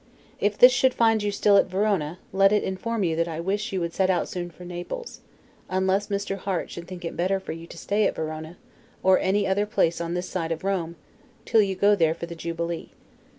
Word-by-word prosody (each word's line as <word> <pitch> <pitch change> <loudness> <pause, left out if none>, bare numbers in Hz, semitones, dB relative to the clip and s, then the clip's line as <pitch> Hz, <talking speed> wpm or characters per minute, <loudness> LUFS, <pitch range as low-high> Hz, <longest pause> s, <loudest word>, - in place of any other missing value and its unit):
If 205 0 0
this 250 - +9
should 255 +1 +2
find 225 -2 +3
you 205 0 0
still 200 0 +4
at - - +4
Verona, 185 -4 0 0.2
let 195 +1 +5
it 210 - +2
inform 215 +3 -2
you 165 -3 +1
that 170 0 +1
I 165 -1 -4
wish 205 +6 -2
you 190 - -1
would 170 0 -3
set 190 -1 +1
out 180 -2 +1
soon 175 -1 -5
for 180 +1 -13
Naples; 180 - -6 0.5
unless 190 +2 +1
Mr. 200 -1 -2
Harte 190 -2 -3
should 170 -1 -8
think 180 -1 -8
it 165 - -4
better 190 +3 +1
for 190 - -7
you 165 +1 -8
to - - -11
stay 205 +3 +1
at - - -3
Verona, 155 +1 -5 0.5
or 190 0 +5
any 200 +2 +1
other 200 +2 +1
place 170 -5 +1
on 170 +1 -3
this 180 +1 -3
side 165 -2 -3
Rome, 180 -4 -1 0.5
till 225 -2 +4
you 195 -2 0
go 205 +2 +4
there 165 -4 +2
for 170 - -6
the 170 - -8
Jubilee. 170 0 -4
185 Hz, 225 wpm, -25 LUFS, 170-205 Hz, 0.5 s, this